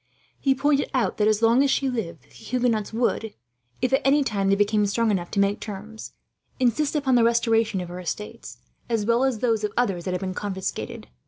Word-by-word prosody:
He 270 -1 +2
pointed 285 +1 +1
out 250 - 0
that, 210 - +2
as 215 +1 +1
long 230 +3 +5
as 280 - +3
she 270 0 +1
lived, 175 - -4
the 145 - -27
Huguenots 240 -4 -1
would, 225 -1 -1 0.5
if 255 +1 +1
at 270 - +4
any 280 +2 +4
time 200 -6 0
they 195 - +4
became 205 +1 +2
strong 225 +2 +1
enough 175 -3 -2
to 200 - -2
make 200 +1 +2
terms, 215 +2 -8 0.5
insist 265 +5 +1
upon 275 -3 +1
the 240 -2 +5
restoration 225 -3 +2
of 175 - -7
her 180 +1 -7
estates, 105 - -6 0.3
as 225 -3 0
well 235 +3 +2
as 265 -3 +1
those 225 -3 +1
of 210 - -1
others 195 -8 0
that 185 - -2
had 180 - -4
been 190 -1 -3
confiscated. 190 -1 -5
225 Hz, 215 wpm, -24 LUFS, 200-250 Hz, 0.5 s, long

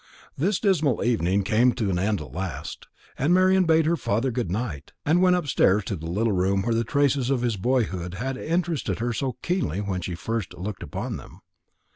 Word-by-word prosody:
The 175 +9 +1
dismal 160 - +2
evening 100 -5 +1
came 120 +5 +3
to 110 -5 -1
an 90 - 0
end 100 -1 0
at 75 -5 -9
last, 80 -4 -5 0.3
and 155 +7 +3
Marian 185 0 +4
bade 160 -1 +4
her 165 +2 +2
father 120 -2 0
good 120 -6 -2
night, 95 - -4
and 165 +4 +3
went 180 -1 +5
upstairs 125 - +2
to 95 - -3
the 80 -1 -6
little 105 +5 +1
room 95 +1 +1
where 115 - 0
the 115 +1 +1
traces 140 0 +1
of 130 -3 +1
his 120 -3 +1
boyhood 95 -5 -1
had 130 +6 -3
interested 165 +2 -1
her 120 +1 -1
so 130 +3 -2
keenly 175 - -1
when 100 -3 -2
first 95 +4 -3
she - - -13
looked 100 +1 -5
upon - - -4
them. - - -13
115 Hz, 200 wpm, -25 LUFS, 95-145 Hz, 0.3 s, went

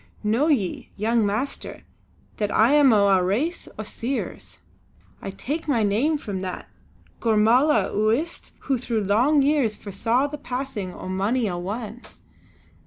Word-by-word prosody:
Know 225 +8 +2
ye, 225 - 0
young 225 +2 +1
master, 225 +8 -4 0.5
that 210 -1 -1
I 225 +5 +4
am 290 -3 +6
o' 205 -2 +4
a 190 -2 +4
race 250 - -1
o' 215 - -4
Seers. 245 +5 -5 0.6
I - - -5
take 295 +11 -4
my 240 -7 +2
name 235 +10 +1
from 205 -9 -5
that 185 -1 -6 0.5
Gormala 230 +6 +3
o' 215 +1 +1
Uist 300 +10 -2
who 270 -3 -1
through 230 -3 -1
long 250 +9 +3
years 275 -7 +2
foresaw 225 +6 0
the 290 +1 -5
passing 250 -8 -4
o' 180 - -9
mony 200 +6 0
a 180 - -2
one. 215 +6 -5
225 Hz, 150 wpm, -24 LUFS, 205-275 Hz, 0.6 s, am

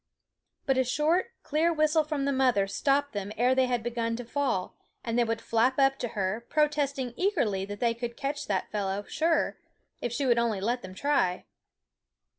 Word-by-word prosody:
But 265 -1 +2
a - - +4
short, 300 +8 +1 0.2
clear 315 +3 +2
whistle 310 0 +3
from 300 -2 -2
the 280 - +1
mother 255 -7 +3
stopped 275 +8 0
them 200 0 -4
ere 250 +3 +4
they 260 -1 +3
had 245 -2 -1
begun 230 -1 -1
to 245 +1 -6
fall; 250 -7 -1 0.3
and 230 -1 -2
they 240 - +4
would 230 0 -1
flap 230 +3 +1
up 270 -1 +3
to 245 - -2
her, 195 +4 -1
protesting 285 -4 0
eagerly 250 - 0
that 205 0 -7
they 235 -1 +2
could 235 0 -6
catch 285 +1 -3
that 195 -3 -1
fellow, 200 -1 -2
sure, 325 +8 0 0.4
if 240 - -2
she 275 +4 -1
would 240 -2 +4
only 230 -4 0
let 240 +5 -1
them 185 -2 -9
try. 230 -8 +1
245 Hz, 190 wpm, -28 LUFS, 225-285 Hz, 0.4 s, a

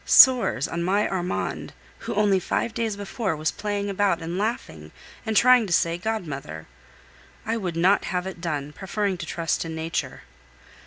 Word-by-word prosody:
Sores 250 - +6
on 170 - -3
my 200 +4 +2
Armand! 180 -1 -3 0.3
who - - -5
only 200 -2 +3
five 225 +5 -2
days 225 -3 -1
before 200 -2 -3
was 155 +1 -1
playing 205 -1 -3
about, 200 -3 +1
and 165 +1 -5
laughing, 185 - -3 0.4
and 220 -1 +1
trying 250 -2 +6
to - - -7
say 170 0 +2
"Godmother!" 150 - -4 0.8
I 225 - 0
would 185 -7 -3
not 185 +4 +3
have 180 0 -2
it 190 -3 -7
done, 150 -4 -3
preferring 195 +2 -2
to 170 - -6
trust 165 -2 -1
in 165 -1 -6
nature. 160 +1 -3
185 Hz, 165 wpm, -25 LUFS, 165-210 Hz, 0.8 s, Sores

